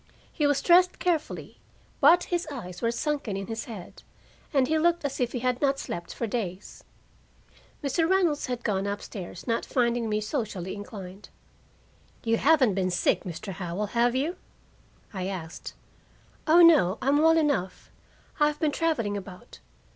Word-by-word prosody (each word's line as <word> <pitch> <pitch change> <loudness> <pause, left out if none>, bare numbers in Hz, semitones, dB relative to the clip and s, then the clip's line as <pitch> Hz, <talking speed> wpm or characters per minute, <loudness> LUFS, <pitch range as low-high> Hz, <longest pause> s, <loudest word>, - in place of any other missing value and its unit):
He 300 -3 +1
was 285 -1 +1
dressed 360 +1 +5
carefully, 335 -4 -2 0.4
but 350 +1 +6
his 350 -1 -2
eyes 180 -10 -7
were 230 - +1
sunken 265 -5 -2
in 195 - -4
his 225 +1 -5
head, 205 -7 -10 0.5
and 270 -5 +3
he 315 +2 +1
looked 340 -1 +2
as 275 - -3
if 245 -2 0
he 245 - -4
had 250 0 0
not 275 -1 +2
slept 175 -9 -6
for 235 - -3
days. 205 -4 -5 1.0
Mr. 325 +4 +1
Reynolds 355 -6 +2
had 245 -2 -4
gone 200 -2 0
up 205 0 -3
stairs, 180 -3 -8
not 230 -2 0
finding 235 -2 0
me 210 0 +1
socially 210 - -3
inclined. 200 -1 -9 0.9
"You 230 0 +2
haven't 275 -7 +4
been 185 -1 0
sick, 180 - +1
Mr. 185 +2 -6
Howell, 180 +3 -3
have 240 +1 +2
you?" 300 +7 -1 0.8
I 185 -2 -3
asked. 175 -4 -7 0.7
"Oh, 340 +3 +7
no, 285 - +6
I'm 280 +3 +2
well 325 +1 +5
enough, 285 - -1 0.5
I've 300 0 +2
been 310 -2 +1
traveling 285 -11 0
about. 185 -2 -9
240 Hz, 160 wpm, -27 LUFS, 195-300 Hz, 1.0 s, Oh